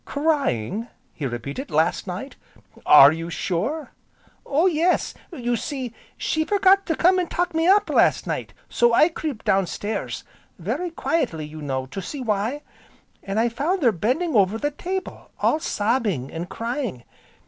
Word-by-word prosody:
"Crying!" 270 - -1 0.3
he 145 - -3
repeated, 135 - -5
"last 160 +6 +1
night! 185 +10 -6 0.5
Are 145 -1 +9
you 165 +1 -4
sure?" 215 - -2 0.6
"Oh 300 +5 +2
yes! 350 0 +2 0.2
You 245 -7 -1
see, 255 0 -4 0.2
she 315 - 0
forgot 395 +1 +3
to 325 - +1
come 365 +3 +4
an' 355 - -1
'tuck 355 0 -1
me 325 +1 +1
up' 405 +2 +5
last - - +3
night, - - -3 0.2
so 240 -1 +3
I 310 - +6
creeped 305 -7 -5
downstairs, 195 - -1 0.3
very 250 - -3
quietly, 270 - -1
you 155 +1 -9
know, 130 -2 -2
to 195 +9 -6
see 275 +9 -6
why. 230 +5 -1 0.6
An' 195 +1 -4
I 230 +2 +3
found 305 +9 -1
her 240 - +5
bending 255 - -1
over 200 +1 +3
the 290 +5 -1
table, 370 +5 -5
all 305 - +2
sobbing, 210 - -1
an' 170 +2 -4
crying. 230 - -4
240 Hz, 155 wpm, -23 LUFS, -, 0.6 s, Are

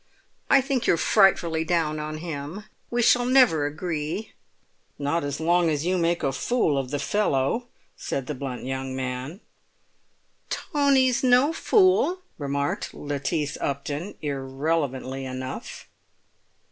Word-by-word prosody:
"I 275 - +6
think 270 -2 -1
you're 170 - +4
frightfully 170 -5 +3
down 160 -2 0
on 155 0 -4
him; 155 +4 -6 0.3
we 240 0 +1
shall 245 +1 +5
never 245 - +4
agree." 155 +5 -4 0.7
"Not 145 +3 -1
as 145 0 -3
long 170 +1 +3
as 150 0 -1
you 185 +1 +1
make 170 0 +1
a 135 - +1
fool 160 - +1
of 135 -2 -2
the 145 - -2
fellow," 205 - 0 0.3
said 135 - -4
the 150 - -4
blunt 130 -2 -5
young 130 0 -3
man. 130 - -4 1.1
"Tony's 275 -5 +2
no 255 +5 +4
fool," 370 0 +3 0.2
remarked 140 0 -2
Lettice 145 +1 -2
Upton, 145 +6 -3
irrelevantly 135 -1 -2
enough. 130 0 -6
155 Hz, 125 wpm, -25 LUFS, 140-210 Hz, 1.1 s, I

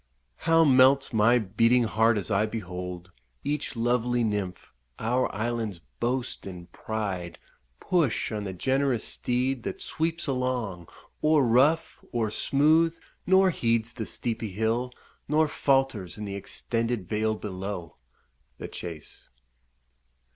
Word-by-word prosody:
How 165 0 +4
melts 135 0 +5
my 115 +3 +5
beating 115 +3 +3
heart 110 0 +3
as 105 +2 -3
I 105 +2 +2
behold 90 -4 -6 0.3
Each 145 -1 -2
lovely 120 +1 +1
nymph, 105 -4 -3 0.2
our 125 +3 0
island's 115 -3 -2 0.2
boast 120 -3 -2
and 90 -2 -9
pride, 95 -6 -4 0.4
Push 165 -10 +1
on 105 -1 -3
the 95 - -3
generous 130 +4 +1
steed, 125 +1 -1
that - - -5
sweeps 165 +1 -2
along 125 - -2 0.4
O'er 155 -2 +5
rough, 130 +7 +2
o'er 110 -3 +1
smooth, 160 +7 +3 0.3
nor 190 0 +5
heeds 115 -5 0
the 110 -3 -5
steepy 115 -2 -3
hill, 110 +5 -1 0.4
Nor 155 +2 +3
falters 135 - 0
in 105 - -5
the 100 - -5
extended 115 +1 -2
vale 110 +2 0
below! 95 -5 -6 0.6
The - - -7
Chase. 85 -4 -9
115 Hz, 125 wpm, -27 LUFS, 105-130 Hz, 0.6 s, melts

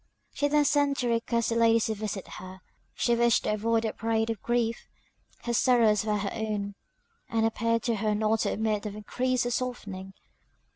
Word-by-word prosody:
She 290 - +1
then 295 0 +3
sent 285 -1 +2
to 245 - -1
request 235 0 0
the 230 - 0
ladies 230 -1 +4
to 220 - -1
visit 210 -2 -5
her; 185 0 -10 0.3
she 240 - +1
wished 235 0 +3
to - - 0
avoid 225 +2 +1
a 220 - -1
parade 225 0 0
of 220 - -6
grief 235 -1 -1 0.6
her 240 - -2
sorrows 225 -4 +3
were 210 -1 +1
her 200 -1 -3
own, 210 -2 -3 0.6
and 225 -1 +1
appeared 230 0 0
to 230 -3 0
her 210 0 0
not 220 +1 +1
to - - 0
admit 215 -1 -1
of 205 - -6
increase 250 +4 -1
or 245 - -1
softening. 205 -7 -4
225 Hz, 190 wpm, -28 LUFS, 210-235 Hz, 0.6 s, ladies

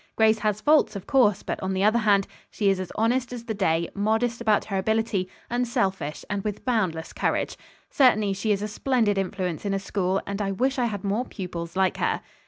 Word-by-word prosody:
"Grace 220 0 +4
has 210 -1 -1
faults, 300 -4 +4
of 195 - -6
course, 230 -8 +3
but - - -4
on 190 0 -2
the 190 - +1
other 215 +3 +4
hand, 200 -3 +3 0.2
she 200 -2 +1
is 190 - -1
as 185 -2 -5
honest 240 +3 +1
as 245 -2 -6
the 225 - -2
day, 170 -5 +1
modest 225 +3 0
about 215 -3 +2
her 195 -2 -2
ability, 220 -2 0 0.2
unselfish 195 -11 -1
and 205 -1 -3
with 210 -1 -4
boundless 185 -10 -1
courage. - - -1 0.4
Certainly 215 -7 +4
she 210 +3 -1
is 205 0 0
a - - -1
splendid 215 -2 +1
influence 185 -3 -3
in 200 -1 -1
a - - 0
school, 190 -1 -1
and 200 +1 -4
I 195 -1 -1
wish 260 +6 0
I 245 - +2
had 205 -5 -3
more 205 +5 0
pupils 170 -5 -6
like 190 0 +2
her." - - 0
205 Hz, 210 wpm, -25 LUFS, 190-225 Hz, 0.4 s, Grace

